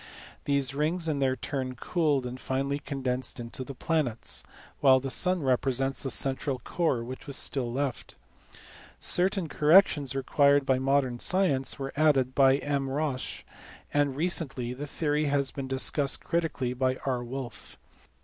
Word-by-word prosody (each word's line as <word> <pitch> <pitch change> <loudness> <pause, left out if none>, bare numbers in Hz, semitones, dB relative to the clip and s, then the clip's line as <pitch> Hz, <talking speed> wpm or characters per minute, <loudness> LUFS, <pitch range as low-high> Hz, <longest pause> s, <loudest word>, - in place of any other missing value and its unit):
These 140 -2 +1
rings 160 +4 0
in 150 -3 0
their 130 -1 +2
turn 130 -1 -4
cooled, 145 -1 0
and 125 +1 -6
finally 140 +2 -1
condensed 130 -3 -3
into 120 +2 -5
the 135 +1 -8
planets, 120 - -1 0.4
while 130 -2 +6
the 135 0 -3
sun 180 0 +2
represents 135 +1 0
the 135 - -3
central 135 +1 +1
core 130 -1 -1
which 130 +3 -8
is 140 - -6
still 125 -4 -3
left. 135 -1 -3 0.8
Certain 185 -1 +1
corrections 150 -4 +4
required 140 +1 +3
by 130 -1 +2
modern 130 -2 +1
science 175 -8 0
were 135 0 -5
added 140 -4 +3
by 135 0 +5
M. 140 -2 -2
Roche, 140 -2 -2 0.5
and 145 -2 +2
recently 140 -6 -1
the 145 +4 -6
theory 150 +1 0
has 140 -2 +1
been 135 -1 -5
discussed 135 +1 0
critically 160 -7 -1
by 130 0 0
R. 125 -3 -1
Wolf. 120 -4 -7
135 Hz, 150 wpm, -28 LUFS, 130-145 Hz, 0.8 s, while